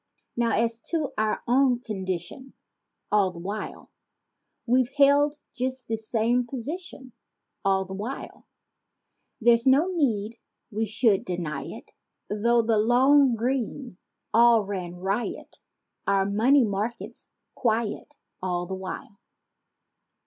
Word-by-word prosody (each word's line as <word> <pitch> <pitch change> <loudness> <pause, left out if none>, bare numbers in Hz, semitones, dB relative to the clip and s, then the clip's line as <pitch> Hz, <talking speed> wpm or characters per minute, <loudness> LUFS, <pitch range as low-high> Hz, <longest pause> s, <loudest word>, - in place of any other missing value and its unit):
48 235 -1 +1
Now 230 - +3
as 230 0 -2
to 310 +3 -3
our 215 0 -1
own 250 0 +3
condition 190 +3 -5 0.6
All 205 -2 +4
the 180 - -11
while, 200 +5 -6 0.7
We've 250 +1 +2
held 285 +1 +5 0.2
just 255 0 -3
the 225 - 0
same 230 +2 0
position 270 +1 -7 0.5
All 190 -1 +2
the 190 - -8
while— 215 +8 -7 0.9
There's 235 +1 +4
no 305 +8 +4
need 230 -8 0 0.3
we 220 +1 -1
should 210 -1 +2
deny 170 -5 -4
it - - -10 0.4
Though 235 +3 +2
the 225 -1 +2
"long 255 +3 +5
green" 245 -2 -3 0.3
all 235 -1 +6
ran 180 -3 -5
riot 195 +6 -3 0.5
Our 195 -1 +3
"money 235 +7 +4
markets" 215 +3 -4 0.2
quiet 230 +4 -1 0.3
All 180 -1 -1
the 190 - -6
while. 190 +2 -7
230 Hz, 120 wpm, -26 LUFS, 200-255 Hz, 0.9 s, all